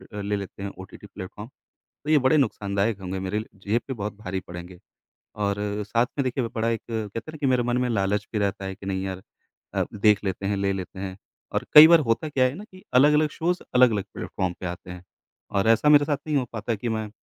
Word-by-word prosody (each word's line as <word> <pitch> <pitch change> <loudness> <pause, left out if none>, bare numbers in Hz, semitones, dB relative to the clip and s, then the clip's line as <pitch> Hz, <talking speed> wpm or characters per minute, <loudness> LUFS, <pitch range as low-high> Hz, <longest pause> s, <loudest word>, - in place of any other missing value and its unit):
अ, 105 - -4
ले 105 +1 -1
लेते 100 0 -7
हैं 100 - -3
ओटीटी 95 +2 -11
प्लेटफ़ॉर्म, 105 +3 -9 0.6
तो 150 - -3
ये 155 - +6
बड़े 130 +3 +3
नुकसानदायक 105 -5 0
होंगे, 95 0 -4
मेरे 95 +3 -2
ल 110 - -4 0.2
जेब 115 +4 +2
पे 130 - -2
बहुत 105 -2 -4
भारी 95 -1 -3
पड़ेंगे। 90 +1 -9 0.6
और 100 -1 0 0.3
साथ 115 +3 +2
में, - - +3
देखिए, 130 0 -1
ब 115 - -4
बड़ा 115 0 0
एक 115 - -1
कहते 110 -1 -3
हैं 155 +7 -8
ना - - -8
कि 140 - +1
मेरे 125 -1 +3
मन 120 0 0
में 125 0 +1
लालच 100 -1 0
भी 110 - 0
रहता 100 -1 -1
है 95 0 -4
कि, 95 - -12
नहीं 95 -1 -2
यार 95 -1 -5 0.5
अ, - - +1
देख 105 0 +3
लेते 95 0 -2
हैं, 100 0 0
ले 100 0 0
लेते 95 0 -6
हैं। 95 -1 -5 0.4
और - - -1
कई 150 +1 +13
बार 170 -1 +7
होता 115 +7 +1
क्या 135 -3 +2
है 130 +1 +1
ना 200 +7 -8
कि 185 -3 -16
अलग-अलग 150 +4 +5
शोज़ 175 +4 -1
अलग-अलग 115 -6 +4
प्लेटफ़ॉर्म 90 -2 -3
पे 90 - -4
आते 90 +1 -7
हैं, 90 0 -9 0.5
और 100 +2 +1
ऐसा 115 +6 +4
मेरे 145 -1 +7
साथ 145 -1 0
नहीं 150 -1 0
हो 135 - +2
पाता 115 +1 -2
कि 115 +3 -4
मैं, 110 -1 -2
105 Hz, 245 wpm, -25 LUFS, 95-125 Hz, 0.6 s, कई